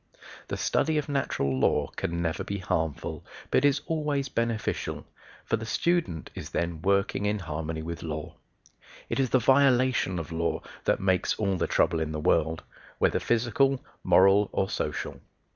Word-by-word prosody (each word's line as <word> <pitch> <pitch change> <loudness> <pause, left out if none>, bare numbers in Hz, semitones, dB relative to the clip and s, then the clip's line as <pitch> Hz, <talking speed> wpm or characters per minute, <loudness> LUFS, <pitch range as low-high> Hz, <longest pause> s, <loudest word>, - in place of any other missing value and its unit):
The - - -3
study 160 -1 +1
of 150 0 -2
natural 70 - 0
law 70 +2 +2
can 85 0 -2
never 80 0 -1
be 100 - -3
harmful, 80 -5 -2 0.3
but - - +3
is 145 0 +3
always 150 -4 -1
beneficial, 115 -4 -2 0.4
for 115 - +1
the 110 - -6
student 165 - 0
is - - -7
then 85 -2 -2
working 100 +2 +1
in 105 +1 +1
harmony 80 -2 -4
with 85 0 -5
law. 75 -2 -5 0.8
It - - 0
is 130 -2 +2
the 130 - +4
violation 130 -6 +3
of 80 0 -5
law 80 -1 -1 0.2
that - - +2
makes 95 -1 +2
all 100 -3 0
the 90 - 0
trouble 80 - +2
in 80 -1 -2
the 75 - -3
world 80 +1 +1 0.3
whether - - +2
physical, 125 +3 +1 0.2
moral, 100 +2 +5
or 95 - 0
social. - - -3
100 Hz, 160 wpm, -27 LUFS, 80-130 Hz, 0.8 s, moral